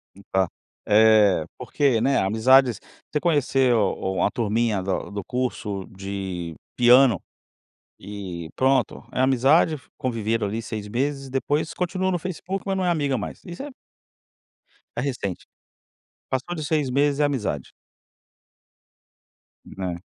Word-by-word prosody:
E 100 - -15
tá 95 -2 +2 0.4
eh, 105 -5 +5
porque, 125 -1 +1
né, 135 +4 +2
amizades 120 +5 +4 0.3
você 150 - +1
conheceu 135 - +2
uma 95 0 0
turminha 110 -2 0
da 95 +2 -2
do 100 0 -4
curso 105 -6 -3
de 95 -4 -5 0.2
piano 125 -4 +6 0.8
e 95 -5 -7
pronto, 135 +1 +1
é - - -4
amizade, 135 +5 +4 0.2
conviveram 115 -5 -1
ali 110 +3 -3
6 110 -2 -6
meses, 135 +4 -2
depois 145 +4 -1
continua 185 +1 -1
no 175 - 0
Facebook, 185 +2 -4
mas 195 -1 -1
não 185 - 0
é - - +2
amiga 145 -6 +1
mais. 105 - -6
Isso 175 +9 -8
é 290 - -6 1.3
é - - 0
recente. 120 -9 -3 0.8
Passou 130 +7 -2
de 155 - -4
6 150 -3 0
meses 140 +2 +2
é - - +4
amizade. 115 - -2 1.9
Né. 90 -2 -5
125 Hz, 130 wpm, -24 LUFS, 100-145 Hz, 1.9 s, piano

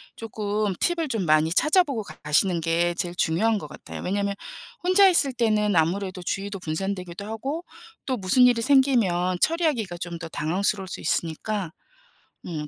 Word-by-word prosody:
쪼끔 210 -2 -2
팁을 335 -2 +1
좀 220 -7 -1
많이 155 0 +3
찾아보고 300 - +3
가 - - -12
가시는 165 +3 +2
게 170 +1 +1
제일 175 0 -3
중요한 200 +7 +1
것 150 - -8
같아요. 150 - -10
왜냐하면 200 +2 -1 0.5
혼자 370 +2 +6
있을 285 -7 +3
때는 215 -4 +1
아무래도 185 +3 0
주의도 195 +2 -3
분산되기도 180 +2 -4
하고 265 +10 -4 0.4
또 260 - -1
무슨 200 +5 +3
일이 235 -2 +2
생기면 220 -10 +2
처리하기가 300 - 0
좀 170 0 -6
더 165 - -6
당황스러울 190 +5 -1
수 - - -7
있으니까. 175 +2 -2 0.7
음. 155 -4 -5
200 Hz, 355 characters per minute, -24 LUFS, 175-230 Hz, 0.7 s, 혼자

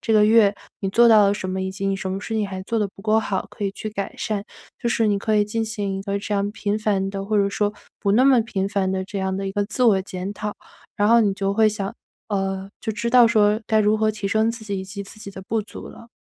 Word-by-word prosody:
这 225 - -1
个 210 -1 +6
月 215 -2 +5 0.3
你 195 - -1
做 235 +5 +5
到 215 -2 +7
了 200 - +2
什 185 -2 -5
么？ 190 0 -2
以 190 0 -2
及 195 +1 -4
你 195 - +1
什 190 -1 -4
么 190 - -2
事 225 - -6
情 215 -2 0
还 190 -1 -5
做 230 +3 -2
得 210 - 0
不 195 - -14
够 220 +1 +3
好， 195 -3 -2
可 - - -9
以 195 - 0
去 215 - -6
改 200 -2 -5
善。 210 -2 -2 0.4
就 240 - -1
是 225 -1 +2
你 205 -1 +2
可 215 +1 0
以 205 - +4
进 225 +2 -2
行 205 -3 -3
一 - - -6
个 200 0 -2
这 205 +1 -5
样 200 0 0
频 205 0 -2
繁 195 -3 0
的， 195 -1 -4
或 215 +1 0
者 200 -1 +3
说 205 0 0 0.3
不 200 -2 +1
那 250 +5 +5
么 260 -4 +6
频 195 -4 -2
繁 195 -3 0
的， 190 0 -2
这 195 +1 -5
样 190 0 -1
的 195 0 -3
一 195 - -3
个 205 +1 0
自 225 +4 -2
我 200 -5 +5
检 190 +1 -5
讨。 210 0 -5 0.4
然 205 - +2
后 235 0 +6
你 200 -3 +2
就 195 0 -1
会 220 +1 +4
想 200 -2 -4 0.3
呃， 195 -1 -2
就 220 - -3
知 235 +2 -2
道 245 -1 +7
说 215 -1 +3
该 220 - +2
如 210 +1 +3
何 215 0 +2
提 210 -1 -5
升 220 +2 +2
自 230 -1 -8
己， 200 -2 -3
以 - - -6
及 200 +1 -7
自 200 +2 -13
己 200 - -8
的 190 -1 -9
不 225 0 0
足 210 - -10
了。 230 - -13
205 Hz, 315 characters per minute, -22 LUFS, 195-220 Hz, 0.4 s, 到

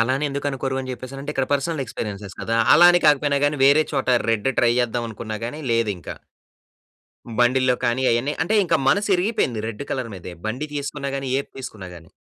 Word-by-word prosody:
అలా 115 +3 +2
అని 145 - -2
ఎందుకు 140 +1 -4
అనుకోరు 135 0 -3
అని 130 0 -6
జెప్పేసనంటే? 135 +3 -7
ఇక్కడ 135 -3 -1
పర్సనల్ 145 +1 0
ఎక్స్పీరియ‌న్సెస్ 105 -4 -6
కదా! 115 0 -1 0.2
అలా 170 +4 +8
అని 175 0 +3
కాకపోయినా 145 -1 +3
గాని 145 0 +1
వేరే 145 +3 +5
చోట 135 -3 -1 0.2
రెడ్ 115 +2 0
ట్రై 120 -1 +4
జేచేద్దాం 120 -1 -1
అనుకున్నా 110 0 -6
గాని 145 +6 -6
లేదింక. 105 -8 -1 1.3
బండిల్లో 130 +1 +3
కానీ 120 +2 +1
అయన్నీ 120 +5 +1
అంటే 175 +7 0
ఇంక 170 - +1
మనసు 205 +2 +2
ఇరిగిపోయింది 175 - 0
రెడ్ 115 +4 -6
కలర్ 125 -3 -3
మీదే. 90 -1 -9
బండి 125 +7 -3
తీసుకున్నా 140 -1 -4
గాని 135 -1 -4
ఏది 140 - -6
తీసుకున్నా 110 -7 -8
గాని. 85 -1 -15
130 Hz, 185 wpm, -22 LUFS, 115-145 Hz, 1.3 s, అలా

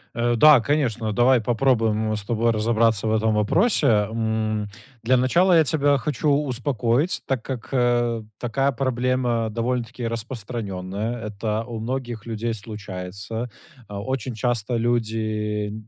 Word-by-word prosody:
Э, 120 0 +1
да, 150 -1 +8
конечно, 120 -5 0
давай 120 +1 +4
попробуем 110 -3 +1
с 105 - -5
тобой 115 +2 +1
разобраться 110 -1 +1
в 110 - +1
этом 110 0 +2
вопросе, 165 - +2
м. 110 -1 0 0.3
Для 130 +2 +3
начала 175 +9 +3
я 160 - +6
тебя 145 -1 +2
хочу 150 +2 -1
успокоить, 135 - 0
так 130 -4 -1
как, 130 -4 -6
э, 120 -2 +1 0.2
такая 135 +3 0
проблема 125 -3 0
довольно-таки 120 +1 -2
распространенная. 110 -2 -4
Это 110 +2 -3
у 115 -2 -6
многих 120 -1 -4
людей 115 0 -3
случается. 100 +2 -6 0.4
А, 100 0 -6
очень 130 0 -3
часто 120 0 -1
люди 110 -3 -1
115 Hz, 130 wpm, -23 LUFS, 110-125 Hz, 0.4 s, да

